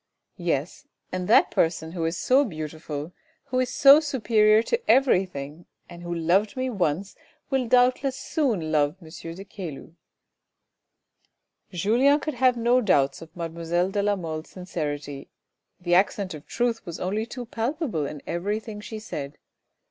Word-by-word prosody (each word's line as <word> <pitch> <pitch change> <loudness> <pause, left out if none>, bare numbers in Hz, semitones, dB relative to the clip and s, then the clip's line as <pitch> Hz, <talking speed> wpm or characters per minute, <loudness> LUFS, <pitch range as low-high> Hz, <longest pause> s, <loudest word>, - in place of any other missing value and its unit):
" - - -54 0.2
Yes, 145 +5 -5 0.2
and 185 -1 -3
that 215 - +5
person 160 -1 0
who 170 -2 -3
is 165 +1 -1
so 260 +9 +4
beautiful, 155 - -6 0.3
who 255 - -2
is 255 -1 +1
so 280 +1 +7
superior 220 -7 +3
to 470 - -1
everything 180 - +2 0.2
and 170 0 -11
who 175 0 -6
loved 175 +7 +1
me 255 0 -1
once, 190 -1 -1 0.4
will 265 -2 +1
doubtless 255 +2 +3
soon 225 - -1
love 150 0 +2
M. 165 -4 -13 0.3
de 195 +2 -9
Caylus." 175 -8 -8 1.8
Julien 235 - +3
could 305 +1 -3
have 250 -1 +3
no 240 +2 +3
doubts 140 - +2
of 165 0 -13
mademoiselle 170 +2 -1
de 205 - 0
la 205 0 +2
Mole's 160 -4 -5
sincerity, 145 -6 -5 0.5
the 175 -1 -1
accent 190 0 +2
of 150 -1 -10
truth 240 -1 -1
was 170 -4 -7
only 210 +5 -2
too 245 +1 -7
palpable 230 - -2
in 150 -1 -8
every 200 +5 -2
thing 215 -2 -8
she 220 +1 -7
said. 145 -9 -6
190 Hz, 155 wpm, -25 LUFS, 165-240 Hz, 1.8 s, so